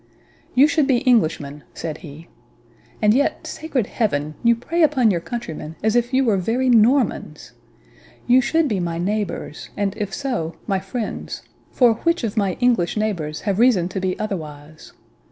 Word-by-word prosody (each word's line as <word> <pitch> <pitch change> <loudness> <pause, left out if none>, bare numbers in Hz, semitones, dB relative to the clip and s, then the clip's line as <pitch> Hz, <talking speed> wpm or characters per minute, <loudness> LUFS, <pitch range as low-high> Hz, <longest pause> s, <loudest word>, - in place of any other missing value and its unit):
"You 270 +4 +7
should 300 -2 +1
be 265 0 +1
Englishmen," 155 - +1
said 160 -1 -5
he; 160 +1 -11 0.8
"and 210 0 +5
yet, 280 +4 0
sacred 290 -8 -2
Heaven! 155 -11 -1
you 235 0 +5
prey 330 +9 -2
upon 265 -8 +4
your 170 -3 -1
countrymen 165 -8 -6
as 220 +1 +2
if 240 0 +1
you 265 +1 +3
were 215 -4 +3
very 235 +8 0
Normans. 245 +3 +2 0.7
You 250 +1 +5
should 320 +5 +1
be 210 -7 -1
my 170 -2 -2
neighbours, 200 -3 -3
and, 200 -1 -1
if 205 -2 -4
so, 210 - -3
my 195 -3 0
friends; 205 +4 -5 0.3
for 245 -3 +4
which 335 -4 +1
of 220 -2 -2
my 200 -4 +1
English 235 -7 +1
neighbours 175 -8 -2
have 200 -1 -1
reason 230 -8 +4
to 190 - -4
be 185 -1 -2
otherwise? 155 -7 -7
215 Hz, 165 wpm, -21 LUFS, 175-245 Hz, 0.8 s, You